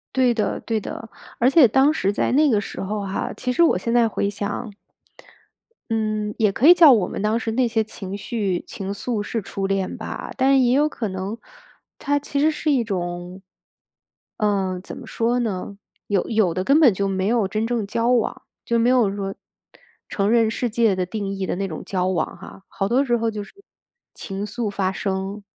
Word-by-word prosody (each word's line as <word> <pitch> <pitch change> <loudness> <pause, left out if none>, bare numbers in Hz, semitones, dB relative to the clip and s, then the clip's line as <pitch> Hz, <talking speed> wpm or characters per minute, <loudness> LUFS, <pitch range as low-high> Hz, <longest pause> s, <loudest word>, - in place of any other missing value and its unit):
对 255 -2 +4
的 220 -2 -1
对 225 -1 -1
的， 220 +2 -7 0.3
而 245 - +4
且 275 -2 +7
当 265 +6 +4
时 195 -10 0
在 205 - 0
那 295 +3 +4
个 220 -5 +3
时 205 - -6
候 205 +2 -3
哈， 195 0 -3
其 250 - -2
实 310 - +1
我 335 - +4
现 230 - -2
在 240 -1 +4
回 205 - -1
想 205 +2 -4 1.2
嗯， 215 -1 -1
也 215 -3 +3
可 245 +8 +2
以 350 - +11
叫 330 -5 +8
我 215 -7 +3
们 - - -5
当 215 +2 +1
时 225 -1 -3
那 250 +1 +2
些 225 -1 +1
情 195 -2 -7
绪 200 -4 -2
情 195 0 -5
愫 215 +1 -3
是 225 +2 -3
初 195 0 -4
恋 195 -1 -1
吧， - - -6
但 270 0 +4
也 245 - +3
有 295 +2 +4
可 240 -7 -4
能 190 +2 -4 0.6
它 285 +1 0
其 285 0 -3
实 310 +2 +4
是 305 0 -1
一 260 -4 +2
种 180 -2 -5 1.0
嗯， 195 -3 0
怎 - - -8
么 - - -10
说 235 +2 0
呢， 200 -3 -3 0.3
有 200 -3 0
有 215 -7 +2
的 185 - -2
根 275 +9 +4
本 270 -9 +6
就 200 +1 -1
没 190 0 -1
有 225 -3 +2
真 215 +3 -1
正 230 -2 -1
交 230 +3 0
往， 245 -3 +1 0.2
就 235 - +1
没 230 +1 +3
有 240 -6 +3
说 195 -1 -3 0.7
承 200 0 0
认 230 -1 +4
世 245 +1 -2
界 225 -3 +2
的 185 -1 -1
定 205 +1 -4
义 195 -1 -3
的 - - -1
那 195 +1 -2
种 160 -4 -7
交 185 -2 -1
往 180 -4 -1
哈， 195 - -12
好 195 - -2
多 250 +6 +2
时 240 -3 +1
候 230 0 -1
就 210 -1 -5
是 - - -15 0.6
情 195 +1 -5
愫 225 0 -3
发 195 -2 -1
生。 195 +1 -3
215 Hz, 225 characters per minute, -22 LUFS, 195-240 Hz, 1.2 s, 以